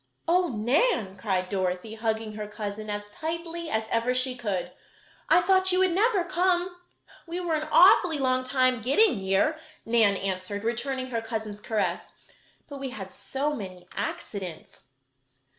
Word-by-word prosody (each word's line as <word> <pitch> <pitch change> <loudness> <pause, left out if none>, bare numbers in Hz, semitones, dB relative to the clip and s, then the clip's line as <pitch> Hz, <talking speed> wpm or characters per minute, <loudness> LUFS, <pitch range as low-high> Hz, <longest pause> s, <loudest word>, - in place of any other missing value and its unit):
"Oh, 355 +2 +3
Nan!" 235 - +1
cried 185 -2 -1
Dorothy, 185 +2 -2
hugging 220 -1 -2
her 210 0 -5
cousin 210 0 -6
as 205 0 -5
tightly 335 +3 -5
as 220 -6 0
ever 235 +2 +1
she 255 0 0
could, 190 -7 -3 0.6
"I 345 +2 +6
thought 375 +1 +4
you 365 - +3
would 375 -1 +3
never 400 +1 +2
come!" 355 0 +1 0.5
"We 340 +2 -4
were 350 -2 -1
an 310 0 -1
awfully 360 -3 +6
long 255 -2 +1
time 255 -2 +2
getting 280 - +3
here," 195 +12 +1 0.3
Nan 225 -4 +3
answered, 195 +2 -3
returning 255 +3 -2
her 230 -1 -1
cousin's 220 -2 -5
caress, 215 -2 -2 0.6
"but 285 -2 -8
we 270 -1 -4
had 195 -6 -8
so 285 +3 -2
many 185 -7 -8
accidents." 185 -10 -6
240 Hz, 150 wpm, -27 LUFS, 205-325 Hz, 0.6 s, I